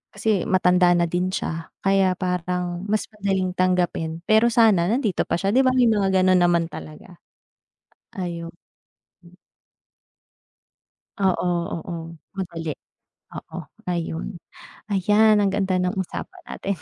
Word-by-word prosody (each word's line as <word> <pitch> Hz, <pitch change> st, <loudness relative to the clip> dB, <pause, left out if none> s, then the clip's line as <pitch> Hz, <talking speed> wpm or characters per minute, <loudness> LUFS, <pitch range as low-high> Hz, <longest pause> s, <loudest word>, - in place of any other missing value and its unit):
kasi 200 Hz, -2 st, +1 dB
matanda 180 Hz, -1 st, +4 dB
na 170 Hz, 0 st, +2 dB
din 180 Hz, +1 st, 0 dB
siya 165 Hz, -3 st, -4 dB
kaya 195 Hz, -1 st, +3 dB
parang 180 Hz, 0 st, -2 dB
mas 215 Hz, 0 st, 0 dB
madaling 190 Hz, -3 st, -1 dB
tanggapin. 175 Hz, -3 st, 0 dB
Pero 220 Hz, +2 st, +5 dB
sana 210 Hz, -7 st, +4 dB
nandito 230 Hz, -7 st, 0 dB
pa -, -, 0 dB
siya 195 Hz, +1 st, 0 dB
di -, -, +6 dB
ba, 255 Hz, -, +4 dB
may 245 Hz, -2 st, +4 dB
mga 200 Hz, -2 st, +1 dB
gano'n 185 Hz, -1 st, +4 dB
naman 170 Hz, -1 st, +3 dB
talaga. 170 Hz, +3 st, -10 dB, 1.0 s
Ayun. 170 Hz, -2 st, -4 dB, 2.7 s
Oo, 185 Hz, -2 st, +1 dB, 0.3 s
oo, 170 Hz, +1 st, -5 dB, 0.4 s
madali. 170 Hz, -4 st, -5 dB, 0.7 s
Oo, -, -, -9 dB, 0.3 s
ayun, 165 Hz, -2 st, -3 dB, 0.6 s
ayan 210 Hz, +2 st, +4 dB
ang 205 Hz, -, +3 dB
ganda 190 Hz, -2 st, +1 dB
ng 180 Hz, +2 st, 0 dB
usapan 345 Hz, -, -6 dB
natin. 200 Hz, -, -4 dB
185 Hz, 120 wpm, -23 LUFS, 175-200 Hz, 2.7 s, di